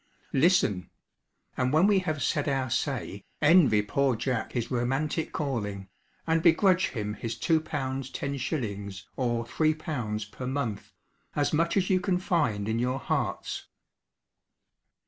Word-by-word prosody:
Listen; 135 Hz, -, +3 dB, 0.7 s
and 125 Hz, 0 st, +1 dB
when 155 Hz, +5 st, +5 dB
we 200 Hz, -1 st, +5 dB
have 155 Hz, -7 st, -2 dB
'said 145 Hz, 0 st, +1 dB
our 135 Hz, -3 st, -1 dB
say,' 125 Hz, -7 st, -2 dB, 0.2 s
envy 145 Hz, -, +5 dB
poor 135 Hz, +4 st, +1 dB
Jack 125 Hz, +1 st, -2 dB
his 120 Hz, -2 st, -2 dB
romantic 135 Hz, +6 st, -1 dB
calling, 105 Hz, -10 st, -3 dB, 0.4 s
and 165 Hz, 0 st, +2 dB
begrudge 185 Hz, +2 st, +4 dB
him 105 Hz, -3 st, -3 dB
his 115 Hz, +2 st, -4 dB
L.2, 165 Hz, -2 st, +2 dB
10s. 130 Hz, -, -3 dB
or 120 Hz, -2 st, 0 dB
L.3 125 Hz, -8 st, -1 dB
per 125 Hz, -, -6 dB
month, 125 Hz, -7 st, -3 dB, 0.4 s
as 145 Hz, +1 st, +1 dB
much 165 Hz, +4 st, +2 dB
as 190 Hz, 0 st, +2 dB
you 185 Hz, -, +4 dB
can 180 Hz, 0 st, +1 dB
find 150 Hz, -, 0 dB
in 110 Hz, +1 st, 0 dB
your 125 Hz, +2 st, 0 dB
hearts. -, -, -2 dB
135 Hz, 130 wpm, -28 LUFS, 115-160 Hz, 0.7 s, when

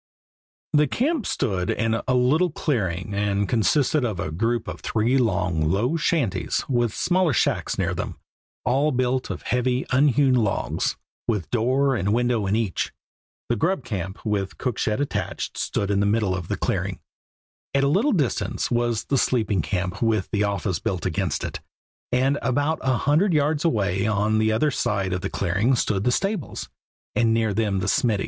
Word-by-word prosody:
The 150 Hz, 0 st, +4 dB
camp 275 Hz, -, 0 dB
stood 95 Hz, -9 st, -1 dB
in 115 Hz, 0 st, 0 dB
a 130 Hz, -, +2 dB
little 145 Hz, +9 st, +3 dB
clearing, 100 Hz, -, -2 dB
and 100 Hz, 0 st, 0 dB
consisted 130 Hz, +6 st, +2 dB
of 110 Hz, -7 st, -2 dB
a 75 Hz, -, -3 dB
group 115 Hz, +7 st, -1 dB
of -, -, -6 dB
three 115 Hz, +4 st, +1 dB
long, 90 Hz, -9 st, +1 dB
low 115 Hz, -, +1 dB
shanties 155 Hz, -, 0 dB
with 120 Hz, -3 st, +1 dB
smaller 180 Hz, -, +1 dB
shacks -, -, 0 dB
near -, -, 0 dB
them, -, -, -4 dB, 0.5 s
all 135 Hz, +4 st, +2 dB
built 130 Hz, 0 st, 0 dB
of -, -, -5 dB
heavy, 125 Hz, +1 st, 0 dB
unhewn 135 Hz, 0 st, +4 dB
logs, 110 Hz, -5 st, 0 dB, 0.3 s
with 105 Hz, -7 st, -1 dB
door 130 Hz, +4 st, +2 dB
and 100 Hz, 0 st, +1 dB
window 120 Hz, -4 st, +1 dB
in 100 Hz, -, +1 dB
each. 110 Hz, -5 st, -1 dB, 0.6 s
The 120 Hz, -, +1 dB
grub 140 Hz, -, 0 dB
camp, 95 Hz, -3 st, -5 dB
with 100 Hz, -3 st, -1 dB
cook 125 Hz, -4 st, -2 dB
shed 110 Hz, +2 st, 0 dB
attached, 145 Hz, -, -3 dB
stood 100 Hz, 0 st, -1 dB
in 100 Hz, -, +2 dB
the 100 Hz, -, +2 dB
middle 105 Hz, -3 st, +1 dB
of 90 Hz, -2 st, -5 dB
the -, -, -2 dB
clearing; -, -, -2 dB, 0.8 s
at 140 Hz, -, +3 dB
a -, -, +3 dB
little 200 Hz, -, +3 dB
distance 145 Hz, -, -1 dB
was 120 Hz, -2 st, +1 dB
the 135 Hz, -, +1 dB
sleeping 110 Hz, -8 st, +1 dB
camp 90 Hz, +1 st, -3 dB
with 110 Hz, -4 st, +1 dB
the 105 Hz, -1 st, +1 dB
office 100 Hz, -3 st, -1 dB
built 90 Hz, -3 st, -3 dB
against -, -, -1 dB
it, -, -, -4 dB, 0.5 s
and 130 Hz, +3 st, +2 dB
about 145 Hz, +5 st, 0 dB
a 130 Hz, -2 st, +1 dB
hundred 160 Hz, -, +2 dB
yards 150 Hz, 0 st, +1 dB
away 100 Hz, -, +1 dB
on 110 Hz, 0 st, +1 dB
the 110 Hz, 0 st, +2 dB
other 130 Hz, +8 st, +2 dB
side 100 Hz, -6 st, -1 dB
of 90 Hz, -, -2 dB
the -, -, -3 dB
clearing 100 Hz, +8 st, +1 dB
stood 105 Hz, -4 st, 0 dB
the 125 Hz, -, +3 dB
stables, 195 Hz, -, -2 dB, 0.4 s
and 115 Hz, -2 st, +2 dB
near 110 Hz, -2 st, +1 dB
them 105 Hz, -2 st, 0 dB
the 95 Hz, -, -2 dB
smiddy. 110 Hz, 0 st, +2 dB
115 Hz, 175 wpm, -24 LUFS, 100-135 Hz, 0.8 s, The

